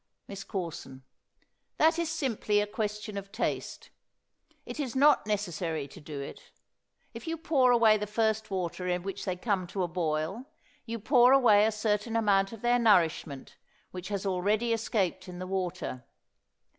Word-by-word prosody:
MISS 200 Hz, 0 st, -7 dB
CORSON. 165 Hz, -9 st, -6 dB, 0.7 s
That 320 Hz, +2 st, +4 dB
is 335 Hz, -2 st, -1 dB
simply 255 Hz, -10 st, 0 dB
a 205 Hz, -, +1 dB
question 210 Hz, 0 st, -4 dB
of 195 Hz, 0 st, -12 dB
taste. 215 Hz, -, -3 dB, 0.7 s
It -, -, -7 dB
is 265 Hz, -5 st, -3 dB
not 285 Hz, -4 st, +4 dB
necessary 175 Hz, -7 st, -2 dB
to 175 Hz, -, -13 dB
do 150 Hz, -1 st, -7 dB
it. 140 Hz, -, -9 dB, 0.6 s
If -, -, -9 dB
you 330 Hz, 0 st, -2 dB
pour 280 Hz, -6 st, +3 dB
away 225 Hz, -3 st, +5 dB
the 210 Hz, 0 st, -4 dB
first 220 Hz, 0 st, 0 dB
water 180 Hz, -1 st, -3 dB
in 180 Hz, -1 st, -1 dB
which 195 Hz, 0 st, -5 dB
they 185 Hz, -2 st, -1 dB
come 185 Hz, -1 st, -1 dB
to 190 Hz, +1 st, -2 dB
a -, -, 0 dB
boil, 165 Hz, +6 st, -2 dB, 0.4 s
you 230 Hz, +1 st, -3 dB
pour 245 Hz, +2 st, +5 dB
away 220 Hz, -6 st, +6 dB
a -, -, +1 dB
certain 215 Hz, +1 st, -1 dB
amount 200 Hz, -3 st, +2 dB
of 225 Hz, 0 st, -10 dB
their 240 Hz, 0 st, +3 dB
nourishment, 165 Hz, -, +1 dB, 0.3 s
which 185 Hz, +2 st, -7 dB
already 205 Hz, +5 st, +1 dB
has 225 Hz, -1 st, 0 dB
escaped 190 Hz, -5 st, -1 dB
in 180 Hz, -1 st, -8 dB
the 185 Hz, -, -5 dB
water. 185 Hz, -9 st, -3 dB
205 Hz, 165 wpm, -29 LUFS, 180-230 Hz, 0.7 s, away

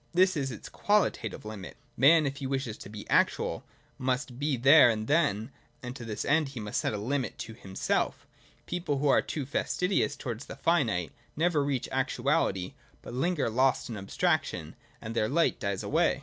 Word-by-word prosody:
This 185 Hz, +1 st, +4 dB
is 140 Hz, -3 st, -1 dB
its 120 Hz, -, -8 dB
qualitative 205 Hz, -, 0 dB
Hmit. 105 Hz, -4 st, -8 dB, 0.2 s
— -, -, -39 dB
Man, 155 Hz, +3 st, +6 dB
if 140 Hz, 0 st, -2 dB
he 135 Hz, -, -4 dB
wishes 130 Hz, -5 st, -2 dB
to -, -, -9 dB
be 105 Hz, 0 st, -9 dB
actual, -, -, +1 dB, 0.4 s
must 125 Hz, -1 st, -2 dB
be 145 Hz, -2 st, 0 dB
there 135 Hz, +2 st, +7 dB
and 110 Hz, -1 st, -1 dB
then, 135 Hz, -6 st, +1 dB, 0.3 s
and 125 Hz, 0 st, -6 dB
to 125 Hz, -, -8 dB
this 110 Hz, -2 st, -4 dB
end 155 Hz, -1 st, +2 dB
he 135 Hz, -3 st, -7 dB
must 105 Hz, -1 st, -2 dB
set -, -, -1 dB
a -, -, -2 dB
limit 130 Hz, +6 st, -2 dB
to 110 Hz, -, -7 dB
himself 95 Hz, -4 st, -2 dB, 0.4 s
People 175 Hz, -5 st, -2 dB
who 145 Hz, +1 st, +1 dB
are -, -, +5 dB
too 145 Hz, -4 st, -4 dB
fastidious 170 Hz, +2 st, 0 dB
towards 125 Hz, -2 st, -6 dB
the -, -, -7 dB
finite 115 Hz, -, +1 dB, 0.2 s
never 160 Hz, -2 st, +2 dB
reach 140 Hz, -3 st, -1 dB
actuality, 95 Hz, -1 st, 0 dB, 0.3 s
but -, -, -8 dB
linger 150 Hz, +3 st, 0 dB
lost 130 Hz, +3 st, +1 dB
in 115 Hz, -, -4 dB
abstraction, 100 Hz, -, -1 dB, 0.3 s
and 110 Hz, +1 st, -6 dB
their 110 Hz, -1 st, +1 dB
light 165 Hz, +4 st, +2 dB
dies 100 Hz, -1 st, -2 dB
away. 165 Hz, 0 st, +2 dB
130 Hz, 185 wpm, -29 LUFS, 110-150 Hz, 0.4 s, there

